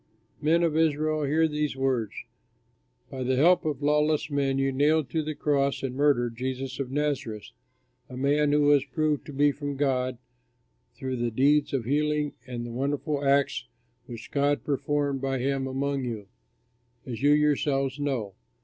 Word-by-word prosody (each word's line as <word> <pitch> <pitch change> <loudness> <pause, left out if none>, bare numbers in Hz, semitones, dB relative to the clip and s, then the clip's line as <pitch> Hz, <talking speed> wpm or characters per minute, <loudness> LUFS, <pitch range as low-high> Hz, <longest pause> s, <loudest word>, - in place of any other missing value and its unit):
'" - - -43
"Men 165 +3 +3
of 165 -2 +1
Israel, 155 -1 +1
hear 160 +3 +2
these 150 -2 -2
words: 130 -5 -1 1.0
By 130 - -5
the 130 +1 +1
help 170 +7 +4
of 145 -2 -2
lawless 150 +1 +2
men 140 -1 0
you 135 0 +1
nailed 145 +2 +2
to 160 - 0
the 155 0 -4
cross 140 -2 0
and 130 -2 -2
murdered 130 -5 +2
Jesus 130 +2 -4
of 135 -2 -3
Nazareth, 135 -7 -2 0.6
a 125 - -8
man 145 +2 +2
who 150 0 +3
was 145 -1 +5
proved 155 -3 -1
to - - -7
be 145 +1 +3
from 145 0 -5
God 130 -3 0 0.8
through 130 -1 -4
the 120 0 0
deeds 140 +5 +2
of 130 -5 -1
healing 150 +2 0
and 120 -1 -5
the 120 - -6
wonderful 140 +3 -2
acts 140 - +1 0.4
which 115 -1 -9
God 145 0 +1
performed 145 -1 -1
by 135 0 -1
him 135 +1 -1
among 135 +1 -2
you, 115 -5 -4 0.8
as 120 -2 -6
you 145 +1 +5
yourselves 145 -2 +1
know. 130 -9 -2
140 Hz, 165 wpm, -27 LUFS, 130-150 Hz, 1.0 s, was